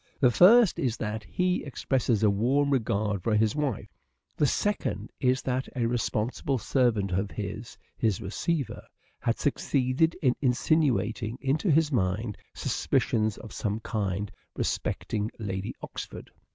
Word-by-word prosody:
The 125 -3 +5
first 210 - +6
is 125 -4 0
that 105 0 -3
he 180 0 0
expresses 130 -5 0
a 105 - +6
warm 135 +8 +2
regard 105 -5 0
for 110 +4 +1
his 110 +2 +2
wife. 145 -7 -2 0.4
The 150 - +3
second 205 +9 -1
is 130 0 +2
that 130 0 -1
a 120 -2 0
responsible 120 +3 -1
servant 110 -4 +1
of 95 +3 0
his, 105 +3 -6 0.2
his 110 -5 +1
receiver, 135 - -2 0.4
had 115 -1 0
succeeded 140 +2 +1
in 125 -2 +4
insinuating 125 -4 +1
into 140 +8 0
his 155 0 +3
mind 105 -1 0 0.2
suspicions 110 -2 0
of 110 - -10
some 105 0 -2
kind 100 -3 -2 0.2
respecting 105 0 -2
Lady 95 -3 -4
Oxford. - - -7
120 Hz, 135 wpm, -28 LUFS, 105-140 Hz, 0.4 s, first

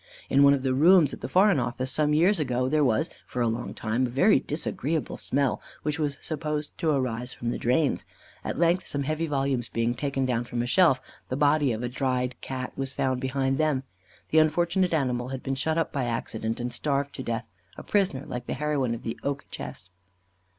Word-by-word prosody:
In 140 - +5
one 140 0 +7
of 135 - -4
the 130 -1 +1
rooms 160 +2 +5
at - - -8
the - - -4
Foreign 190 -4 +4
Office, 130 +1 -2
some 150 +1 +2
years 170 +6 +4
ago, 130 -3 0
there 150 +2 +2
was, 110 -5 +1 0.2
for 125 - -5
a 120 - +2
long 115 +2 -3
time, 115 +4 0
a - - -7
very 160 - +4
disagreeable 150 0 -2
smell, 140 -1 0 0.2
which 150 0 -1
was 145 -2 -1
supposed 150 -1 -3
to 160 - +1
arise 125 -3 -1
from 120 0 -3
the - - -3
drains. 130 +5 +1 0.4
At - - -3
length 170 +3 +2
some 140 -1 -1
heavy 155 +3 -1
volumes 135 -4 -1
being 115 +1 0
taken 135 +1 -1
down 120 -2 0
from 120 0 -2
a - - -2
shelf, 150 +1 +4 0.3
the 130 - -2
body 145 -1 +3
of 115 +1 -3
a - - 0
dried 125 0 -1
Cat 130 -1 -5
was 135 -1 -3
found 130 -1 0
behind 135 +1 0
them. 150 -4 +1 0.5
The 160 - +6
unfortunate 170 +4 +2
animal 125 -6 0
had 130 0 -5
been 135 - -1
shut 155 +4 0
up 165 - 0
by 135 -3 0
accident, 115 -1 -3
and 120 0 -3
starved 140 +1 -1
to - - -6
death, 115 -2 -3 0.3
a - - -8
prisoner, 185 -10 0
like 125 0 -6
the - - -2
heroine 140 -4 0
of 115 - -10
the 115 - -4
"Oak 140 0 -2
Chest." 90 - -7
135 Hz, 215 wpm, -27 LUFS, 125-150 Hz, 0.5 s, one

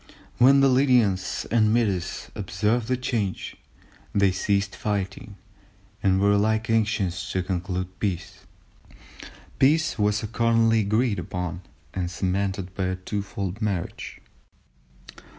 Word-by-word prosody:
When 135 +3 +7
the 135 - +6
Lydians 125 -8 +2
and 110 -2 +4
Medes 100 -6 -1
observed 110 +3 -1
the 130 0 +1
change 115 -7 -2 0.6
they 100 -1 +4
ceased 100 +1 0
fighting, 100 0 -3 0.7
and 95 -1 +3
were 100 +1 +4
alike 110 +2 +1
anxious 105 -5 0
to 95 - 0
conclude 95 0 -3
peace." 95 0 -3 1.2
Peace 155 +1 +3
was 105 +1 +1
accordingly 115 0 +2
agreed 110 0 +1
upon 90 0 -4 0.3
and 90 -2 -2
cemented 95 0 -2
by 95 0 -2
a 95 0 -1
twofold 100 +1 -4
marriage. 100 -5 -3
100 Hz, 115 wpm, -25 LUFS, 95-115 Hz, 1.2 s, When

